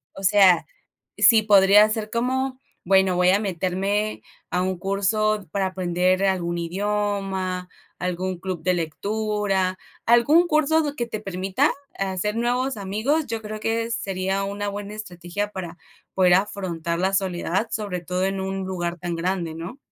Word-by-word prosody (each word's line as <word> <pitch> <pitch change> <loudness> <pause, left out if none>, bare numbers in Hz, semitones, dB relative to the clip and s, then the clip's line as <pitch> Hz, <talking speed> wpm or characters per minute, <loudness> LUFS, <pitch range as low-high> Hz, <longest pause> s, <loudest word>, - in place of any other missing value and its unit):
O 195 - -9
sea, 195 -2 +5 0.5
sí 225 -2 +6
podría 205 0 +6
ser 215 -1 -3
como 260 +3 -1 0.3
bueno, 190 -1 +4
voy 180 0 +4
a 195 - +4
meterme 195 +2 -1 0.3
a 180 - 0
un 185 0 -1
curso 200 +2 0
para 195 +2 0
aprender 185 0 +1
algún 175 -2 0
idioma, 190 0 -2 0.3
algún 180 0 -3
club 180 -2 -5
de 180 +2 +2
lectura, 195 +2 -1 0.3
algún 260 +9 +5
curso 310 -1 +2
que 240 - -2
te 220 -2 -5
permita 195 +7 0 0.3
hacer 195 +2 -1
nuevos 245 +2 0
amigos. 220 +11 -1
Yo 225 -1 -3
creo 215 0 -6
que 225 +1 -1
sería 195 -2 -1
una 205 +1 -3
buena 205 0 -5
estrategia 195 0 -5
para 180 -3 -7 0.3
poder 180 -2 +4
afrontar 180 -4 -1
la 190 +2 +1
soledad, 190 +2 0
sobre 200 -5 -3
todo 180 +2 -1
en 195 0 -2
un 190 0 -3
lugar 175 -2 -3
tan 175 0 -3
grande, 170 -1 -2
¿no? 170 +11 -7
195 Hz, 150 wpm, -23 LUFS, 180-215 Hz, 0.5 s, sí